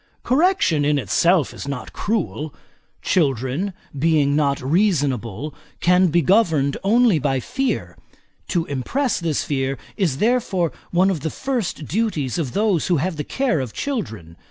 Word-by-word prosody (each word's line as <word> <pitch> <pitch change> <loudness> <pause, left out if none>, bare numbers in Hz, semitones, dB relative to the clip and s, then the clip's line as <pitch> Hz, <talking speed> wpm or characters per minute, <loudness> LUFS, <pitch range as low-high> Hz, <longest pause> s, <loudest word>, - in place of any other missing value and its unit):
Correction, 260 - +2
in 145 0 +2
itself, 170 +3 +2
is - - -8
not 140 -3 -5
cruel; 170 -8 -2 0.5
children, 140 - 0 0.3
being 145 -2 +3
not 140 -2 +1
reasonable, 140 - 0 0.3
can 180 +1 +4
be 170 0 +2
governed 160 - +3
only 220 -3 +4
by 135 -2 0
fear. 270 - -2 0.5
To 170 -3 0
impress 240 - -1
this 165 -4 -1
fear, 135 -1 -1 0.2
is 170 -10 0
therefore 210 - +1 0.2
one 185 +2 +3
of 175 - -2
the 160 - -3
first 240 - -3
duties 175 - -1
of 140 -7 -3
those 205 -6 +1
who 175 -3 +2
have 170 +4 -1
the 150 - -2
care 265 - 0
of 125 -5 -4
children. 110 - -4
165 Hz, 145 wpm, -21 LUFS, 140-200 Hz, 0.5 s, can